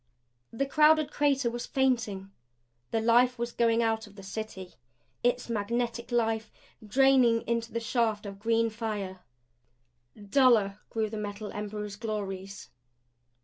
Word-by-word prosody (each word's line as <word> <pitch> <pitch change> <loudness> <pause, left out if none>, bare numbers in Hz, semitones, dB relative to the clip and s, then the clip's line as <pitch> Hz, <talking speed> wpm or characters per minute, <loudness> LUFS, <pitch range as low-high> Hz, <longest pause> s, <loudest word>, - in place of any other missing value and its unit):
The 275 +4 -1
crowded 305 +1 +4
crater 275 -4 +1
was 240 0 -5
fainting. 225 -8 0 0.6
The 225 - 0
life 245 +2 +4
was 235 0 -3
going 230 0 +2
out 225 -1 0
of 205 - -17
the 195 - -11
City 190 -2 -7 0.5
its 245 0 +1
magnetic 235 +2 -2
life, 225 -2 0 0.3
draining 250 0 +4
into 230 0 -2
the 230 - -2
shaft 225 -3 0
of 195 -1 -8
green 230 +1 +1
fire. 210 -4 -4 1.0
Duller 210 -2 +3
grew 220 -1 -1
the 220 - -4
Metal 210 0 -5
Emperor's 210 -1 -5
glories. 200 -3 -5
225 Hz, 130 wpm, -29 LUFS, 210-240 Hz, 1.0 s, crowded